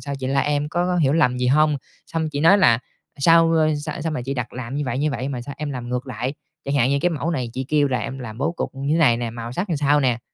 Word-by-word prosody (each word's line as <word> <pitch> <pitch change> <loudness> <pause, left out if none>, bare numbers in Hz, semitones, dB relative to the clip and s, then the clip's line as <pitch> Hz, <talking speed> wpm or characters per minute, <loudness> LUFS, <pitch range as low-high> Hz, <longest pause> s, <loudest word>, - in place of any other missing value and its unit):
sao 140 -1 -5
chị 130 - -4
la 140 +1 +2
em, 145 0 0
có 175 +3 0
có 180 -1 0
hiểu 145 -5 +3
lầm 125 -6 +3
gì 125 - 0
hông?" 150 +2 +3 0.3
Xong 160 -1 -2
chị 145 -1 -3
nói 195 +6 +6
là 115 -9 +5 0.4
"Sao, 165 +3 +5
a, 155 -1 +3
sao 155 - -5
sao 160 +1 -2
mà 140 - -3
chị 135 +3 -3
đặt 125 -2 -4
làm 125 +1 -6
như 145 - -1
vậy, 125 +1 -2
như 150 +1 +1
vậy, 130 0 -3
mà 130 -3 -4
sao 140 +2 -7
em 150 -2 -3
làm 125 -3 -5
ngược 125 +2 -3
lại. 125 +3 -4 0.3
Chẳng 140 +1 -2
hạn 130 -1 +3
như 140 - +2
cái 175 - +2
mẫu 165 +1 -2
này 130 -7 -2
chị 130 +1 -3
kêu 145 -2 +3
là 125 -2 0
em 135 -1 -5
làm 115 -3 -8
bố 155 +5 0
cục - - -4
như 140 +3 -1
thế 165 - +2
này 130 -8 +5
nè, 120 -1 -3
màu 115 +1 -7
sắc 180 +6 -3
làm 160 - +1
sao 145 +1 +3
nè, 125 -3 +1
140 Hz, 315 wpm, -22 LUFS, 125-155 Hz, 0.4 s, nói